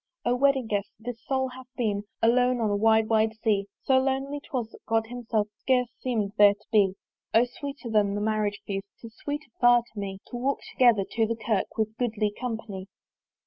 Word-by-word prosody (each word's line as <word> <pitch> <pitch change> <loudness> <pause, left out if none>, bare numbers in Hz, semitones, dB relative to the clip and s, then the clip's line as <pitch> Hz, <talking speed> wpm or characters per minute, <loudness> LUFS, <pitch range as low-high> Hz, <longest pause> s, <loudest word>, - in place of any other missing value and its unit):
O 245 - +3
Wedding 270 -1 +3
guest! 205 -2 -1
this 230 0 -7
soul 265 -1 0
hath 255 0 -11
been 205 -4 -1 0.2
Alone 245 +2 +4
on 220 -3 +1
a - - +2
wide 220 +1 +4
wide 220 0 +2
sea: 200 -2 +2 0.2
So 265 -1 +4
lonely 270 +2 -1
'twas, 250 -6 -4
that - - -16
God 225 0 +2
himself 225 -3 -2
Scarce 250 -2 +2
seemed 220 -6 -1
there 205 -1 +8
to - - -28
be. 200 -4 +4 0.4
O 230 +2 +6
sweeter 275 +1 -7
than 210 -3 +2
the - - -1
Marriage 210 -1 0
feast, 195 0 -4
'Tis 230 -1 -11
sweeter 290 -2 -5
far 240 -1 +6
to 210 - -7
me 195 -1 -4
To 245 - -4
walk 265 +3 -1
together 235 -6 +4
to 225 -1 +1
the 230 - -1
Kirk 220 -3 -2
With 220 -1 +1
a - - -29
goodly 220 -4 0
company. 220 -6 -5
225 Hz, 200 wpm, -27 LUFS, 210-250 Hz, 0.4 s, there